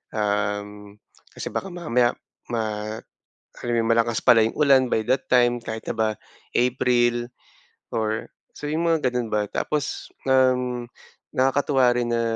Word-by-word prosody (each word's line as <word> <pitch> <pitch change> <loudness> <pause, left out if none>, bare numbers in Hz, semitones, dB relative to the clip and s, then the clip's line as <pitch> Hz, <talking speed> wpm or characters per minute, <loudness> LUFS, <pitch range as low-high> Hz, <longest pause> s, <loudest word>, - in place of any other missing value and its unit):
Um, 105 -1 -2 0.4
kasi - - -5
baka 195 - -3
mamaya 125 -8 +1 0.4
ma, 110 -1 -2 0.6
alam 120 - -3
mo - - +2
yun? - - -1
Malakas 115 0 +1
pala 115 -2 +6
yung - - -7
ulan 135 -4 +5
by 110 - +1
that 130 +1 +1
time, 120 -1 +4
kahit 110 -1 -6
na - - -6
ba 110 -1 +1 0.5
April 120 -1 +2 0.6
or 110 -1 -2 0.2
sabihin 155 +3 -2
mong 165 -2 +2
ganun 125 -2 0
ba. 105 -1 +1
Tapos, 150 -2 -2 0.2
um, 125 -2 +2 0.5
nakakatuwa 135 -1 +3
rin 120 -1 -1
na 115 - +1
120 Hz, 140 wpm, -24 LUFS, 110-130 Hz, 0.6 s, pala